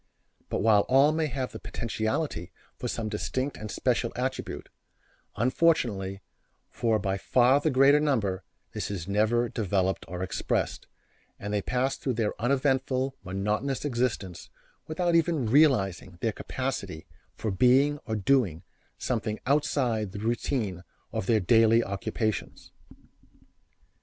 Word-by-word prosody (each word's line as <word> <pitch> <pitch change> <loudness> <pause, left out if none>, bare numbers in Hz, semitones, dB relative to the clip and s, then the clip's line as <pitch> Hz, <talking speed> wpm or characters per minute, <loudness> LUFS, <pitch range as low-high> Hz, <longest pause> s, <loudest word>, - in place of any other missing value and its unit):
But - - -1
while 105 -2 +5
all 135 +3 +6
may 155 0 0
have 130 -2 -3
the - - -8
potentiality 110 - -3 0.2
for - - -5
some 115 -2 -3
distinct 130 +6 -2
and 110 - -7
special 120 0 0
attribute, 130 +1 -3 0.7
unfortunately 115 - +1 0.5
for 115 -2 +1
by 95 -2 -2
far 125 +6 +4
the 155 - +2
greater 135 +2 +5
number 105 - 0 0.3
this - - -4
is 95 -4 -5
never 110 +4 +2
developed 95 -4 -1
or 90 +2 -4
expressed, 95 - -2 0.5
and 105 +1 -4
they 105 - +1
pass 130 +5 -1
through 130 - -2
their 110 -2 0
uneventful, 130 0 +1
monotonous 105 +9 -2
existence, 120 - -2 0.4
without 170 +2 0
even 165 -5 +2
realizing 105 - +2
their 115 - 0
capacity 100 -9 -4 0.3
for 110 - -3
being 130 +8 +4
or 110 - -1
doing 100 - +1 0.3
something 105 0 -2
outside 125 -7 +1
the 100 - -5
routine 110 -4 -2 0.3
of 110 -4 -3
their 110 -2 +4
daily 115 +3 +4
occupations. 105 +2 -3
115 Hz, 125 wpm, -28 LUFS, 100-135 Hz, 0.7 s, all